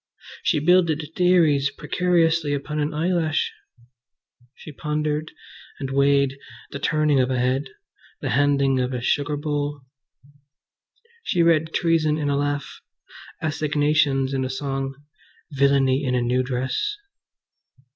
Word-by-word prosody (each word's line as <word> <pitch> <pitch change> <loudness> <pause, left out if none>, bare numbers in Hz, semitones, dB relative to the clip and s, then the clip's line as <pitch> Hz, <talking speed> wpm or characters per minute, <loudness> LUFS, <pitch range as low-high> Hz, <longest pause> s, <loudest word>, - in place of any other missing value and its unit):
She - - +1
builded 160 -2 +2
theories 165 -6 +3
precariously 165 -2 +1
upon 150 +2 -4
an 150 +1 -1
eyelash. 160 0 0 1.0
She 155 - -11
pondered 150 +1 -2 0.5
and 135 -1 -4
weighed 140 0 +2 0.3
the 140 - -5
turning 150 -3 +2
of 130 0 +2
a 130 - 0
head, 130 +3 0 0.5
the - - -3
handing 140 -2 +2
of 125 +1 -1
a 125 - -3
sugar 145 +3 0
bowl. 145 -1 -3 1.4
She 180 - +1
read 160 -1 +2
treason 160 -3 +1
in 145 -2 -1
a - - +1
laugh, 145 0 -3 0.6
assignations 150 -3 +1
in 135 -1 0
a 130 - -3
song, 135 0 -3 0.6
villainy 140 -1 +2
in 125 -2 0
a 125 - +1
new 125 +2 +1
dress. 130 - -2
145 Hz, 125 wpm, -23 LUFS, 135-155 Hz, 1.4 s, theories